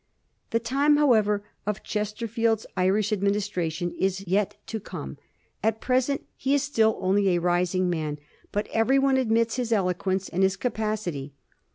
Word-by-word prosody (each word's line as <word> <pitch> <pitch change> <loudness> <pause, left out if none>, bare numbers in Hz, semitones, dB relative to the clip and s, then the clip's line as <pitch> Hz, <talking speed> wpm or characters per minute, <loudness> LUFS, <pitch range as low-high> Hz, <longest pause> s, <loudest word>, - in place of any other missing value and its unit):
The 230 - +1
time, 280 +6 +3
however, 215 -8 +3 0.2
of 210 -1 -2
Chesterfield's 220 +1 -1
Irish 195 +3 +2
administra 200 -4 0
tion 175 +2 -3
is 195 +1 0
yet 200 +3 +1
to 220 - -4
come. 70 - -8 0.4
At 220 +1 +1
present 260 +3 0
he 275 +1 +1
is 285 - +1
still 225 -7 +2
only 195 +1 +2
a - - +1
rising 180 +1 +1
man; 155 -4 -2 0.3
but 205 +1 -1
every 225 +5 +3
one 270 -1 +3
admits 230 -2 +1
his 245 -2 -2
eloquence 190 -1 0
and 185 - -2
his 190 0 +3
capacity. 210 - -3
210 Hz, 155 wpm, -26 LUFS, 185-230 Hz, 0.4 s, time